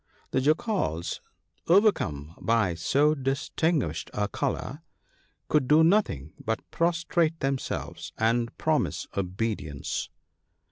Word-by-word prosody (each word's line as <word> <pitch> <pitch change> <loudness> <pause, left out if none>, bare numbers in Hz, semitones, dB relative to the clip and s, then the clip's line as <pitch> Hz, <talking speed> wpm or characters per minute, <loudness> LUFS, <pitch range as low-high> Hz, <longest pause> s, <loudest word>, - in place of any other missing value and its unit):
' - - -33
" - - -38
The 130 - +2
Jackals, 155 - 0 0.5
overcome 95 - +3
by 110 -6 +2
so 140 - +3
distinguished 135 - -1
a 105 0 +1
colour, - - -3 0.7
could 150 -4 +2
do 155 +3 +6
nothing 160 - +2
but 110 0 -2
prostrate 170 -1 +1
themselves 135 -1 -3
and 115 +1 +1
promise - - 0
obedience. 95 -7 -3
130 Hz, 105 wpm, -27 LUFS, -, 0.7 s, do